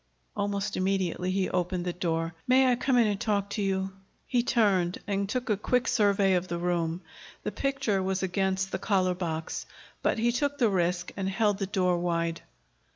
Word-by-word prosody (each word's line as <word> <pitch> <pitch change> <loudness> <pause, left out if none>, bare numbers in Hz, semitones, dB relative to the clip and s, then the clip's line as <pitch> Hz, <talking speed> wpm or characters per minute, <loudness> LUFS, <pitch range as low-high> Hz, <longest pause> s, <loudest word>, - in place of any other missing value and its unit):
Almost 200 -1 -1
immediately 185 -1 0
he 185 0 +1
opened 180 0 -1
the 175 - -1
door. 165 -1 -1
"May 255 0 +5
I - - +3
come 250 +1 +1
in 235 - +5
and 205 -1 -1
talk 200 -3 0
to 210 - -2
you?" 190 -1 0 0.3
He 245 - +2
turned 195 -7 +2
and 200 -1 -1
took 255 +3 -2
a 215 - +2
quick 250 +5 0
survey 200 -2 +3
of 180 0 +1
the 170 - -3
room. 170 -1 -1 0.4
The - - -2
picture 270 -8 0
was 190 0 -1
against 190 +1 0
the - - -2
collar 185 -3 +2
box. 165 -3 -4 0.3
But - - +1
he 235 +2 +2
took 285 +3 -1
the 240 -5 +3
risk 175 -2 0
and 190 -1 -2
held 205 +1 +1
the 195 - -1
door 180 -3 +1
wide. 170 -1 -1
195 Hz, 190 wpm, -28 LUFS, 180-210 Hz, 0.4 s, May